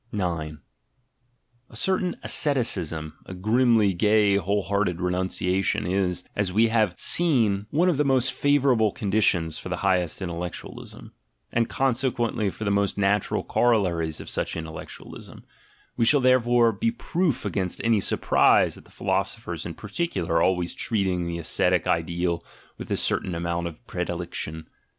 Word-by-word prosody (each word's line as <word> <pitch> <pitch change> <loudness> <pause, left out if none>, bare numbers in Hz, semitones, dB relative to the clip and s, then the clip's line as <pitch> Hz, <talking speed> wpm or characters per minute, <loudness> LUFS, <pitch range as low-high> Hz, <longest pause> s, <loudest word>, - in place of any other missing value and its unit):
A 80 -4 -3 1.2
certain 185 +7 0
asceticism, 85 - 0
a 95 - -7
grimly 110 +1 +3
gay 105 +2 +3
whole 100 +2 0
hearted 100 -3 0
renun 90 +1 -1
ciation, 95 0 -1
is, 90 -1 0
as 105 -3 -1
we 110 +4 +3
have 110 -1 +1
seen, 115 - +1
one 165 +8 +2
of 175 -6 +2
the 150 - +3
most 130 -2 +2
favourable 135 -7 +2
conditions 95 -7 0
for - - -8
the - - -1
highest 90 -4 +1
intellectualism, 85 -2 -7 0.4
and, 115 -1 +1
conse 130 0 +1
quently, 115 -4 -1
for 90 - -8
the 100 - 0
most 100 0 0
natural 100 0 +1
corollaries 90 -10 +1
of - - -9
such - - -3
intel 80 -1 -6
lectualism: - - -10 0.5
we 115 - +1
shall 145 +5 +5
therefore 120 -2 +4
be 230 - -1
proof 180 - -1
against 95 -2 -2
any 115 -2 +3
sur - - -1
prise - - +3
at - - -19
the - - -20
philosophers - - -3
in - - -7
particular 95 - -2
always 90 -1 +1
treating 95 -5 -1
the 85 0 -3
ascetic 85 -2 +1
ideal 85 0 -1 0.3
with - - -9
a - - +1
certain 90 - -1
amount 85 0 -2
of 80 -2 -11
predilection. 80 +1 -5
100 Hz, 150 wpm, -25 LUFS, 90-120 Hz, 1.2 s, shall